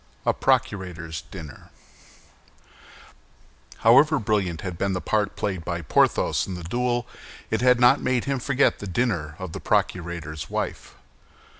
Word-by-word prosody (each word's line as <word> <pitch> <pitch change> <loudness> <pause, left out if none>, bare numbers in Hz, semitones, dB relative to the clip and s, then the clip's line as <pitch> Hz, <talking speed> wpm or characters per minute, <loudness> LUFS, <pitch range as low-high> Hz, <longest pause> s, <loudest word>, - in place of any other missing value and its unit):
A - - +3
PROCURATOR'S 85 -5 -1
DINNER 80 -6 -10 2.2
However 150 +7 +6
brilliant 100 - -1
had 95 -3 -5
been 100 +3 -1
the 90 - -1
part 105 +1 0
played 95 -5 -3
by 85 +1 -4
Porthos - - +2
in 95 - -5
the 90 - -7
duel, 120 +6 -1 0.4
it - - 0
had 125 -1 +5
not 120 0 +5
made 125 -2 0
him 140 -1 -1
forget 140 +2 +2
the 100 - -6
dinner 90 -8 -1
of 95 -3 -6
the - - -6
procurator's 85 -4 -2
wife. - - -4
95 Hz, 140 wpm, -24 LUFS, 85-120 Hz, 2.2 s, However